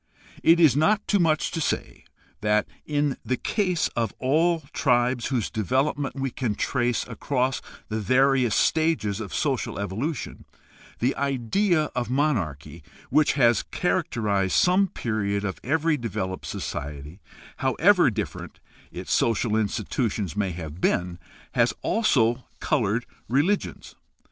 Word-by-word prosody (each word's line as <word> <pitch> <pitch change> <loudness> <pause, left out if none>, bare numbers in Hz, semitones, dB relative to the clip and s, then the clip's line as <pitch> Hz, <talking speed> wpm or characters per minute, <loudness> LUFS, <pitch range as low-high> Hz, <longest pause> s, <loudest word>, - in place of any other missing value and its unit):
It 165 +1 +5
is 155 -7 +6
not 200 +8 +2
too 205 - +2
much 155 -3 +2
to 165 - -3
say - - -3 0.3
that, 105 0 +1 0.2
in 145 -2 0
the 130 - -1
case 185 -6 0
of 115 -3 -2
all 160 +5 +2
tribes 120 -2 +1
whose 125 -6 -1
development 135 - 0
we 135 -1 -2
can 115 -5 -2
trace 120 0 0
across 130 +2 -1 0.3
the 110 0 -3
various 130 0 +3
stages 155 -11 +1
of 110 -3 -6
social 140 -5 -1
evolution, 110 - -4 0.5
the 125 +3 0
idea 145 - +1
of 120 -2 -2
monarchy, 85 - -1 0.3
which 155 -1 +4
has 120 -6 +4
characterized 100 -4 -1
some 185 +2 +4
period 105 - -2
of 95 - -4
every 160 +3 +1
developed 95 -6 -4
society, 75 +5 -6 0.4
however 170 +6 +4
different 105 -2 -5 0.3
its - - -4
social 115 -1 +1
institutions 110 - -1
may 105 -2 0
have 80 -1 -7
been, 90 0 0 0.3
has - - +2
also 125 - +2 0.2
colored 115 -4 0 0.2
religions. 150 - 0
125 Hz, 125 wpm, -25 LUFS, 105-150 Hz, 0.5 s, is